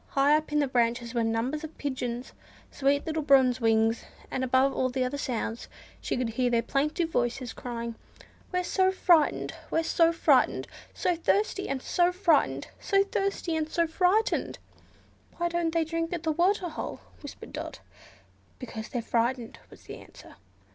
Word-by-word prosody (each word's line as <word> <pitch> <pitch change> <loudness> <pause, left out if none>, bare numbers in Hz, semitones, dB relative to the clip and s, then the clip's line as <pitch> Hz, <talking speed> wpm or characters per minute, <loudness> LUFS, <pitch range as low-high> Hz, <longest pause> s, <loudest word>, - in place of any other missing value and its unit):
High 280 +2 +5
up 310 0 -1
in 300 - +1
the 290 -1 +2
branches 235 -1 0
were 235 -2 +1
numbers 230 +7 -1
of 315 0 -8
pigeons—sweet 265 +2 -3
little 320 -1 -1
Bronze 265 -3 +4
Wings; 225 0 +2 0.3
and 260 - -2
above 260 +2 +3
all 255 - 0
the 255 0 -1
other 255 +3 -3
sounds 235 -3 -3 0.3
she - - -2
could 245 -2 -1
hear 245 +2 0
their 235 -1 +2
plaintive 300 +6 0
voices 240 -2 -1
crying, 235 -1 -5 0.6
"We're 360 -1 0
so 375 +1 +2
frightened! 345 -5 +3 0.2
we're 325 - +1
so 330 0 +3
frightened! 335 - +2 0.2
so 355 - 0
thirsty 390 +3 0
and 265 -1 -3
so 350 0 +2
frightened! 350 -5 +1
so 395 -1 +3
thirsty 395 -4 -2
and 310 -1 -1
so 335 +1 +1
frightened!" 365 +6 +1 0.8
"Why 345 0 0
don't 340 -1 0
they 330 -1 +1
drink 330 +1 -2
at 340 -2 -4
the 320 - +1
waterhole?" 350 0 -1 0.2
whispered - - -10
Dot. - - -6 0.8
"Because 225 -4 -7
they're 240 -2 -3
frightened," 235 +1 -1
was - - -16
the - - -9
answer. - - -15
285 Hz, 160 wpm, -28 LUFS, 245-335 Hz, 0.8 s, High